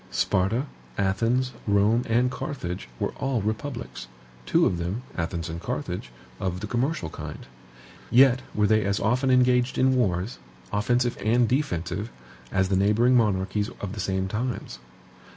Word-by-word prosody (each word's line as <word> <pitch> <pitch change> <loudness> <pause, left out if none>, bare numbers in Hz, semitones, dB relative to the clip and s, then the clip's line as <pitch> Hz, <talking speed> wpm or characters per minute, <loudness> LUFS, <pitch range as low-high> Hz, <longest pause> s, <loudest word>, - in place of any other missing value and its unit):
Sparta, 105 +8 +1 0.3
Athens, 115 +7 +1 0.2
Rome, 105 +3 +4
and 120 +2 +2
Carthage 90 - -5
were - - -1
all 135 -2 0
republics; 110 - -4 0.4
two - - +4
of 85 - +1
them, 90 +8 -3
Athens 85 0 -2
and 85 0 -5
Carthage, 105 - -4 0.3
of 90 -1 -2
the 105 - -4
commercial 125 - -1
kind. - - -7 0.6
Yet 130 0 +6
were 105 - +3
they 110 +1 +3
as 100 0 0
often 125 +5 +1
engaged 125 0 +3
in 130 0 +4
wars, 100 -3 0 0.3
offensive 120 +4 +1
and 120 +2 +3
defensive, 100 - -1 0.4
as 95 -1 +1
the 95 - +2
neighboring 105 +6 +4
monarchies 105 -2 +1
of 100 -1 -4
the 110 - -6
same 95 -1 -1
times. 110 - -3
110 Hz, 145 wpm, -26 LUFS, 95-125 Hz, 0.6 s, Yet